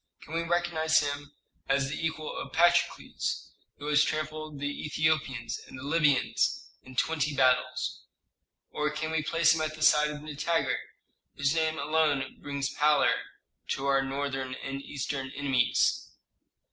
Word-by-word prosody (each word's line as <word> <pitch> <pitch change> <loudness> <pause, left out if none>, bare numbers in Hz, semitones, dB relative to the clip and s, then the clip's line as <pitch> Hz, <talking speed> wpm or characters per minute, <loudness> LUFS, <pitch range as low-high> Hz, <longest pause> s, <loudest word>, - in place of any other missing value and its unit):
Can 155 - -11
we 165 - +1
recognize 170 -2 +1
him 145 0 -4 0.3
as 135 0 +2
the 150 - -4
equal 155 -1 -3
of - - -6
Patrokles, 175 +1 +1 0.3
who 145 - -9
has 150 0 +4
trampled 155 -1 -3
the 145 +1 -3
Ethiopians 140 -7 0
and - - -10
the 130 - -8
Libyans 145 -2 +2
in 130 0 -13
twenty 150 +1 0
battles? 130 -1 +2 0.7
Or 150 0 0
can 155 +1 -3
we 160 -1 +1
place 165 +1 +3
him 160 - -1
at 155 0 -2
the 155 - -4
side 150 0 +5
of 150 0 -7
Nitager, 155 +2 0 0.6
whose 145 0 +1
name 160 -1 +1
alone 150 -4 +1
brings 140 -1 -3
pallor 150 0 +4 0.5
to 135 - -2
our 135 -1 +3
northern 135 -1 -3
and 135 +1 -5
eastern 135 -1 -4
enemies?" 135 -4 +2
150 Hz, 145 wpm, -29 LUFS, 135-155 Hz, 0.7 s, side